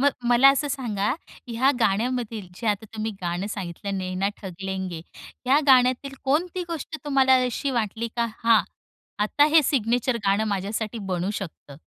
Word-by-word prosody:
मग 285 +1 +5 0.2
मला 245 +3 +7
असं 285 +2 0
सांगा, 230 -7 -1 0.4
ह्या 245 +4 +3
गाण्यामधील 225 -1 0
जे 225 +5 -6
आता 210 +1 0
तुम्ही 220 0 -2
गाणं 175 +3 -2
सांगितलं 195 +1 -4
नैना 185 +1 -1
ठग 190 -3 -7
लेंगे 190 -3 -4 0.4
ह्या 265 +3 +4
गाण्यातील 255 +1 +4
कोणती 340 +6 0
गोष्ट 320 -1 -5
तुम्हाला 270 -2 +4
अशी 250 +3 -2
वाटली 230 -1 -2
का, 235 - +1 0.2
हां, 230 -1 +6 0.6
आता 290 +7 +3
हे 320 - +8
सिग्नेचर 245 -1 +1
गाणं 200 +2 +3
माझ्यासाठी 215 +4 -3
बनू 180 +2 -1
शकतं? 160 -6 -8
230 Hz, 150 wpm, -25 LUFS, 195-265 Hz, 0.6 s, हे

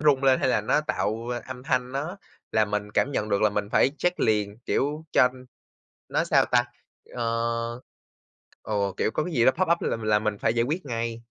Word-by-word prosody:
rung 145 -3 +3
lên 130 -1 +4
hay - - +2
là 115 - +2
nó 105 +8 +2
tạo 115 -6 -2 0.2
âm 130 -1 -8
thanh 130 -3 -1
nó 155 +7 -3 0.4
là 110 -1 +4
mình 105 0 -3
cảm 140 - +1
nhận 105 -3 -1
được 100 0 +1
là 105 - +4
mình 105 0 -2
phải 135 - +4
check 180 0 0
liền, 105 -1 +1
kiểu, 150 +3 -1
cho 125 - +6 0.8
nó - - +1
sao - - +4
ta, 120 -1 +3 0.5
ờ, 115 0 -2 0.8
ồ, 100 -2 -1
kiểu, - - +1
có 155 - -1
cái 180 - -5
gì 120 -4 +3
đó 130 - +7
pop 185 +3 0
up 170 - +2
là - - -1
là 105 -1 +3
mình 105 -1 -2
phải - - +1
giải 115 - +2
quyết 150 +7 -2
ngay. 115 -2 -3
115 Hz, 210 wpm, -26 LUFS, 110-135 Hz, 0.8 s, đó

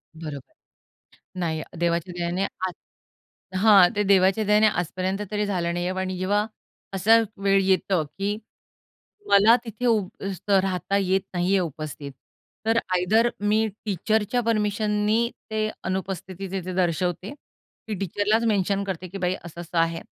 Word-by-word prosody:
बरोबर. 150 -4 -8 0.9
नाही, 160 -2 -1 0.2
देवाच्या 170 +1 0
दयाने 175 +2 -1 0.2
आज 185 - -4 0.9
हां, 200 -5 +8
ते 210 - +3
देवाच्या 195 +2 +4
दयाने 210 +1 +4
आजपर्यंत 185 +3 -3
तरी 210 0 0
झालं 175 -4 -1
नाहीये 175 +1 -1
आणि 185 -1 -3
जेव्हा 205 +3 +1 0.5
असं 225 +4 +5 0.2
वेळ 195 0 +4
येतं, 190 -3 +2
की 200 +1 -1 0.9
मला 210 +4 +7
तिथे 225 +2 -4
उभं 215 -5 +2 0.4
राहता 195 -1 +2
येत 190 0 +2
नाहीये 180 +2 +2
उपस्थित. 155 -3 -5 0.5
तर 225 +1 +3 0.2
आयदर 215 +6 +3 0.2
मी 220 +1 +3 0.2
टीचरच्या 215 +4 0
परमिशननी 215 0 +1 0.2
ते 215 0 0 0.2
अनुपस्थिती 190 0 -4
तिथे 185 -1 -4
दर्शवते. 180 - -1 0.5
की 215 - -2
टीचरलाच 205 +4 +1
मेन्शन 200 -2 +1
करते, 185 -2 -5
की 195 +3 -7
बाई 180 -1 0
असं-असं 170 0 -5
आहे 165 0 +1
195 Hz, 130 wpm, -25 LUFS, 180-210 Hz, 0.9 s, हां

